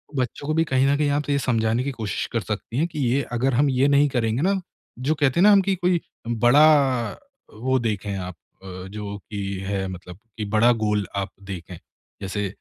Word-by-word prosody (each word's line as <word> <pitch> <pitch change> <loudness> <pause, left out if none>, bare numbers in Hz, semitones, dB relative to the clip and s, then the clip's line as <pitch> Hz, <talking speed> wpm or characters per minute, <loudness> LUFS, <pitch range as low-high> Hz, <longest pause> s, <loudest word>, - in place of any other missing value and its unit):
बच्चों 130 +2 -3
को 155 - +1
भी 160 +1 +3
कहीं 130 -2 +2
न 140 - +3
कहीं 150 -1 +1
आप 145 +1 -1
ये 140 - +2
समझाने 115 -2 +1
की 140 - -2
कोशिश 110 -7 -3
कर - - 0
सकती 115 - -5
हैं 160 +4 +2
कि 160 -3 -7
ये 130 +4 +2
अगर 130 +3 +1
हम 140 +4 +3
ये 130 +1 +3
नहीं 145 +1 +4
करेंगे 120 -1 0
ना, 195 +3 +2 0.4
जो 140 +5 +1
कहते 145 +1 +1
हैं - - +5
ना 210 - +8
हम 200 -1 +6
कि 195 0 0
कोई 175 -1 +1 0.3
बड़ा 130 +1 +4 0.4
वो 130 +4 0
देखें 105 -3 -2
आप 90 -1 -6 0.3
अ, - - -10 0.2
जो 105 0 -6
कि 100 -2 -3
है 95 -1 -2
मतलब 90 -1 -9 0.2
कि 105 - -3
बड़ा 110 +3 +5
गोल 105 -2 0
आप 100 -1 -2
देखें। 90 -2 -7 0.4
जैसे 100 +1 -2
125 Hz, 210 wpm, -23 LUFS, 105-145 Hz, 0.4 s, ना